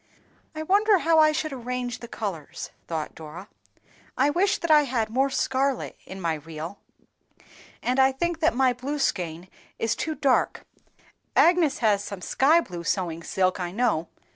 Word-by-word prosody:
"I 310 - -3
wonder 405 +4 +4
how 330 -2 +3
I 310 0 +6
should 310 -1 -2
arrange 250 -1 -4
the 235 - -9
colors," 195 -10 -6 0.2
thought 160 -2 -3
Dora; 160 +5 -10 0.7
"I 280 +3 +3
wish 395 +6 +2
that 335 - -1
I 300 -1 +6
had 230 -4 -1
more 265 +3 +2
scarlet 265 0 -1
in 190 - -8
my 170 -3 0
reel, 160 +4 -7 1.0
and 255 +2 +1
I 265 0 +6
think 335 +5 -2
that 325 -6 +2
my 260 -1 +3
blue 265 +5 -4
skein 175 - -2 0.3
is 225 - 0
too 315 -1 -3
dark; 270 -2 +1 0.7
Agnes 340 -5 +4
has 205 -2 +3
some 200 -2 -7
sky 310 - +4
blue 175 - -7
sewing 170 -2 -1
silk, 185 +2 0
I 175 -1 -3
know. 205 -6 0
250 Hz, 165 wpm, -25 LUFS, 185-300 Hz, 1.0 s, I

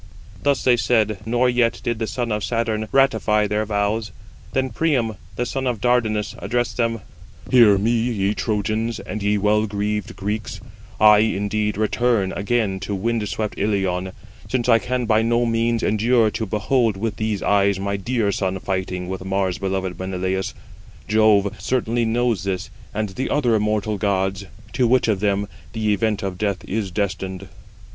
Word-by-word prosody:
Thus 140 +4 +1
they 125 -1 +4
said, 110 -4 +1
nor 120 +2 +2
yet 120 -1 +2
did 120 -2 -1
the 110 - -1
son 120 +2 -3
of 105 -1 -1
Saturn 110 0 -1
ratify 110 -6 +3
[their 105 +1 -1
vows]. 105 0 -1 0.4
Then 130 -1 0
Priam, 125 -4 +1 0.2
the 125 - -1
son 130 +1 -2
of 120 -4 -1
Dardanus, 110 -3 +1
addressed 120 0 -1
them: 115 -2 0 0.5
"Hear 115 -6 +7
me, 110 +4 +1
ye 115 -4 +1
Trojans, 110 +1 -1
and 105 - -6
ye 105 +1 +2
well 105 +2 +2
greaved 105 0 -3
Greeks: 105 +2 -4 0.4
I, 105 -1 +7
indeed, 105 0 0
return 110 -2 +1
again 100 -2 0
to 100 +1 -3
wind 110 +1 -1
swept 105 0 -3
Ilion, 95 -3 0 0.4
since 125 -2 -1
I 115 -2 +6
can 125 +1 -2
by 110 -1 +3
no 120 +1 +2
means 115 0 +1
endure 110 +1 +3
to 110 -1 -3
behold 110 +1 +1
with 105 0 -3
these 110 -2 -2
eyes 100 -1 +2
my 100 +1 -2
dear 105 +1 0
son 95 -1 -1
fighting 95 -1 -3
with 95 0 -5
Mars 95 -1 -1
beloved 95 -2 -2
Menelaus. 95 0 -2 0.5
Jove, 105 -2 +4
certainly, 120 -2 0
knows 115 -4 0
this, 95 -2 -3 0.2
and 110 -1 -2
the 125 +8 -3
other 125 -6 +2
immortal 105 -1 0
gods, 95 -1 0 0.3
to 125 -2 +2
which 125 +1 +3
of 105 -4 +1
them 100 0 0 0.3
the 110 -2 +1
event 105 0 0
of 95 -2 -4
death 100 -3 -1
is 100 -1 -2
destined." 95 0 -3
105 Hz, 165 wpm, -22 LUFS, 100-115 Hz, 0.5 s, Hear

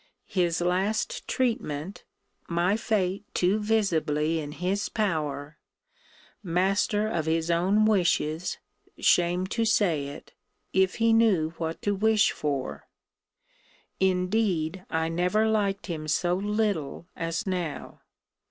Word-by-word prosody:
His 175 -3 0
last 190 +5 -1
treatment 195 - -2 0.4
my 175 +3 +2
fate 200 -3 -1
too 185 +4 +2
visibly 165 -8 +1
in 150 -1 -6
his 190 +6 -1
power 150 -8 -2 0.8
master 195 +4 +1
of 165 -7 -2
his 165 +1 +1
own 190 +6 +3
wishes, 175 -5 +1 0.4
[shame 175 +1 +3
to 230 - +1
say 180 -10 +2
it,] 140 - -10 0.4
if 190 -1 +3
he 230 -1 +3
knew 200 -9 +3
what 165 0 -4
to 205 - +1
wish 215 +1 +3
for. 140 -3 -3 1.1
Indeed 185 -2 +1
I 160 0 0
never 180 +6 +1
liked 200 -4 0
him 160 -4 -5
so 175 +3 +1
little 200 -6 -1
as 165 +6 -3
now. 180 -6 -4
180 Hz, 115 wpm, -27 LUFS, 165-210 Hz, 1.1 s, own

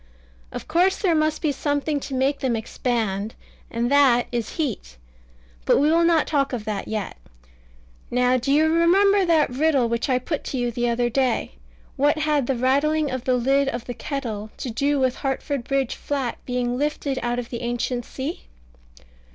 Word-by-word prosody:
Of - - -7
course 360 +4 +3
there 365 -5 +1
must 310 0 0
be 305 - +2
something 290 +1 -1
to 270 -1 -6
make 270 +2 +1
them 260 -4 0
expand, 220 -2 -2 0.3
and 235 +2 -1
that 270 -4 +5
is 235 -2 -3
heat. 230 - -3 0.7
But - - +3
we 295 +3 +3
will 335 +1 +4
not 335 -2 +3
talk 275 -3 0
of 225 -4 -4
that 210 -2 -3
yet. 215 - -4 0.9
Now 250 +1 +2
do 255 +3 -1
you 305 +2 +4
remember 380 +5 +4
that 325 -6 +3
riddle 275 -2 +2
which 235 +3 -2
I 255 - +3
put 285 +4 -3
to 265 - -3
you 245 -1 0
the 240 +1 -1
other 240 +1 0
day? 255 -2 0 0.5
"What 290 +3 +3
had 300 -4 +1
the 270 - +1
rattling 285 +4 +1
of 260 -1 -4
the 255 - +2
lid 270 +3 +2
of 240 -2 -5
the 245 - -5
kettle 230 -6 -5
to 250 - -4
do 280 +5 +1
with 260 -1 +1
Hartford 270 -1 -2
Bridge 275 -2 0
Flat 275 -4 -3
being 245 0 -1
lifted 290 -2 -1
out 240 0 -1
of 245 -1 -5
the 235 - -4
ancient 240 +1 -2
sea?" 275 +6 -6
265 Hz, 185 wpm, -23 LUFS, 240-295 Hz, 0.9 s, that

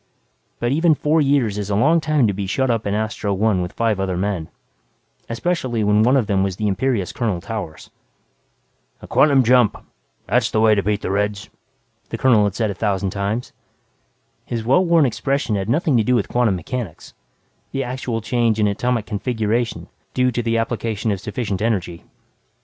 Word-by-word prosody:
But 120 +1 0
even 160 +2 +3
four 155 +2 +2
years 135 -8 +1
is 100 -1 -4
a 100 - 0
long 160 +10 +3
time 155 -4 +2
to 100 - +1
be 100 0 -4
shut 130 +6 0
up 115 -3 -1
in 100 - 0
Astro 105 -2 -2
One 105 -2 +1
with 90 0 -4
five 115 -4 0
other 95 -2 -1
men, 95 -4 -2 0.8
especially 120 -3 -1
when 105 +1 +3
one 125 +5 +4
of 125 - +1
them 100 -2 +1
was 95 -1 -1
the 105 +2 -2
imperious 105 -1 0
Colonel 110 -8 -1
Towers. 100 -5 -7 1.1
"A - - -7
quantum 140 -3 +4
jump 125 -2 +4 0.5
that's - - +1
the 110 - 0
way 110 0 +5
to 100 - +2
beat 105 +1 -1
the - - -2
Reds," 100 0 -2 0.6
the - - -4
colonel 115 -6 +4
had 100 -1 -2
said 110 -3 0
a - - -3
thousand 95 -1 -1
times. 100 +5 -3 0.9
His 115 -2 -4
well 135 +10 +4
worn 170 -4 +4
expression 135 -1 -1
had 100 +1 -3
nothing 155 +2 +2
to 110 - +3
do 125 +4 +2
with 110 - 0
quantum 120 -5 +2
mechanics 105 -2 -6 0.6
the 135 - -2
actual 125 -2 -3
change 115 -1 +1
in 105 - +3
atomic 115 +2 -1
configuration 110 +1 -2 0.3
due 125 0 +2
to 120 - -1
the 115 -1 0
application 115 -1 -2
of 100 - -2
sufficient 105 -2 -3
energy. 95 -7 -2
110 Hz, 185 wpm, -20 LUFS, 100-125 Hz, 1.1 s, way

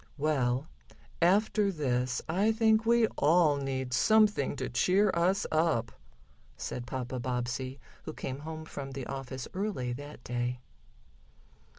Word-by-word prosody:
"Well, 140 -2 0 0.5
after 200 +3 +3
this 125 -6 -1
I 195 +7 +2
think 220 0 +3
we 235 0 +5
all 155 -1 +4
need 130 -2 -3
something 205 - +3
to - - -3
cheer 190 - +3
us 185 +4 +2
up," 155 -8 +1 0.7
said 125 0 -5
Papa 130 -1 -4
Bobbsey, 130 +2 -3 0.3
who 155 - -5
came 135 -2 -5
home 155 +1 -7
from 135 -3 -7
the 135 -2 -5
office 135 -1 -6
early 185 -11 -2
that 145 0 -9
day. 120 +1 -2
145 Hz, 125 wpm, -30 LUFS, 125-185 Hz, 0.7 s, we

